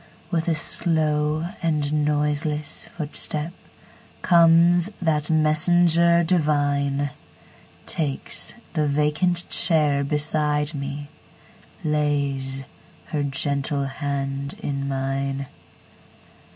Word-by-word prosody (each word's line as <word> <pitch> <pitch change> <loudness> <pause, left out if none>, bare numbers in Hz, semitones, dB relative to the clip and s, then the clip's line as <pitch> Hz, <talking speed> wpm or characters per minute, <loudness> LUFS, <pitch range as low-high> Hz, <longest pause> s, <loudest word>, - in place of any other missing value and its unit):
With 165 -2 -1
a 165 - +1
slow 155 0 0
and 150 -2 0
noiseless 150 0 -1
footstepComes 170 +2 +1
that 155 -4 0
messenger 170 +2 +3
divine, 145 -4 0 0.7
Takes 145 +6 0 0.2
the 155 -3 0
vacant 150 +5 +1
chair 150 -4 +4
beside 150 +1 0
me, 140 0 -6 0.7
Lays 140 -3 -1 0.5
her 150 - -2
gentle 140 0 -1
hand 140 0 -4
in 140 -1 -3
mine. 135 0 -3
150 Hz, 75 wpm, -23 LUFS, 140-160 Hz, 0.7 s, chair